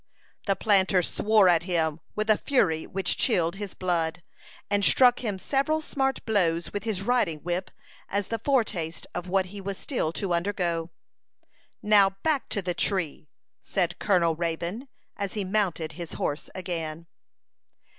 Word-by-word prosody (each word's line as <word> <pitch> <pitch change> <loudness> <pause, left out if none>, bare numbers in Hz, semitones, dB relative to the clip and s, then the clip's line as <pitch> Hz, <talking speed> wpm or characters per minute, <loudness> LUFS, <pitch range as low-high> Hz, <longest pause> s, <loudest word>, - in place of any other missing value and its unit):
The 195 - +3
planter 190 -2 +3
swore 210 +2 +3
at 170 -2 +5
him 165 -3 0 0.2
with 215 0 -1
a - - +6
fury 185 - +1
which 190 -1 -1
chilled 175 -6 +1
his 205 -2 -6
blood, 175 -1 -1 0.4
and 205 0 +1
struck 250 +3 +6
him 210 -5 -2
several 280 +9 0
smart 270 -3 -2
blows 170 -6 +1
with 205 - -4
his 205 -4 -2
riding 210 -9 +1
whip 180 +2 -2 0.4
as 200 0 -2
the 230 - -2
foretaste 210 - 0
of 175 +1 -4
what 190 +1 +2
he 200 - -6
was 195 0 -4
still 245 - -2
to 190 -1 -2
undergo. 170 -2 -1 0.9
"Now, 200 -2 +5
back 305 -4 0
to 200 - -1
the 180 -1 -1
tree," 175 -6 -1 0.3
said 175 -3 -1
Colonel 175 -5 +2
Raybone, 170 - -3 0.3
as 200 -2 -3
he 205 -3 -2
mounted 185 -5 0
his 170 +1 -7
horse 145 - -3
again. 165 -3 -4
190 Hz, 155 wpm, -27 LUFS, 170-210 Hz, 0.9 s, a